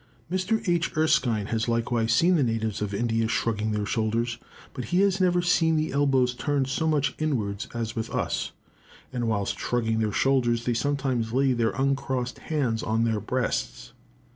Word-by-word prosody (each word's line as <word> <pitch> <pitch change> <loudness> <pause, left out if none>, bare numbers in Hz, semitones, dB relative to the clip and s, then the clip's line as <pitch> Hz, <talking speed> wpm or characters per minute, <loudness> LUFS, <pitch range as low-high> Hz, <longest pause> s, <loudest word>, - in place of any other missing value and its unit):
Mr. 190 +4 0
H. 170 -2 0
Erskine 125 -9 +2
has 115 0 -1
likewise 115 -1 0
seen 170 +10 +4
the 160 - +3
natives 115 -4 -1
of 105 -1 -2
India 115 +1 0
shrugging 110 -1 0
their 105 -1 -1
shoulders; 115 +2 -1 0.3
but 125 -3 -5
he 180 +2 +2
has 195 -1 +2
never 180 -1 +3
seen 165 -2 +3
the 155 0 0
elbows 135 -3 +2
turned 140 +2 0
so 135 +5 -1
much 145 -3 +1
inwards 110 -10 -1
as 115 0 -3
with 110 -1 -3
us; - - -2 0.6
and 120 -2 -1
whilst 100 -3 -1
shrugging 115 -2 0
their 110 -1 0
shoulders 120 -2 +1
they 120 - +1
sometimes 130 -2 -1
lay 135 0 +3
their 115 -2 +1
uncrossed 135 -2 -1
hands 130 -8 -1
on 110 +1 0
their 115 -2 +1
breasts. 110 - -3
120 Hz, 170 wpm, -26 LUFS, 115-145 Hz, 0.6 s, seen